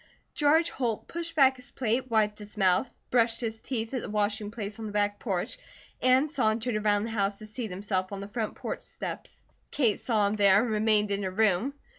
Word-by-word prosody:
George 315 +3 +3
Holt 235 -5 -2
pushed 335 -1 -5
back 270 -3 +5
his 250 - -15
plate, 255 +1 -1
wiped 215 -2 +2
his 210 0 -11
mouth, 185 +4 +3 0.2
brushed 230 -2 +3
his 225 -2 -4
teeth 225 -2 -4
at 255 - -1
the - - -6
washing 210 0 0
place 210 -1 -6
on 220 - -4
the - - -6
back 205 0 0
porch, 200 - -2 0.4
and 255 +3 +4
sauntered 235 -4 0
around 210 -1 +2
the 225 - -4
house 200 -2 0
to 215 - -9
seat 220 +1 -5
himself 190 0 -2
on 200 - -5
the 200 - -6
front 215 +1 -3
porch - - -5
steps. - - -7 0.3
Kate 235 -8 +1
saw 220 -4 +1
him 205 +2 0
there 200 -1 +6
and 240 - -2
remained 210 -1 +2
in 200 0 0
her 190 - -1
room. 220 +6 +1
215 Hz, 210 wpm, -28 LUFS, 205-245 Hz, 0.4 s, there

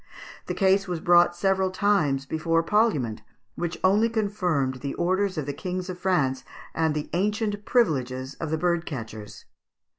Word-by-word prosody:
The - - -3
case 195 0 +3
was 175 -2 -3
brought 175 +1 +4
several 190 +1 +1
times 180 -8 +1
before 165 +3 0
parliament, 165 - +1 0.3
which 175 -1 -4
only 205 +5 +4
confirmed 180 - -1
the 140 +1 -5
orders 185 +2 0
of 150 - -2
the 145 - -3
kings 185 +3 -4
of 180 - -9
France 145 -9 +1 0.3
and 160 -2 0
the 150 - -3
ancient 205 +2 -1
privileges 130 - 0
of 160 - -3
the 160 - 0
bird 175 0 0
catchers. 110 -6 -7
175 Hz, 155 wpm, -25 LUFS, 145-195 Hz, 0.3 s, brought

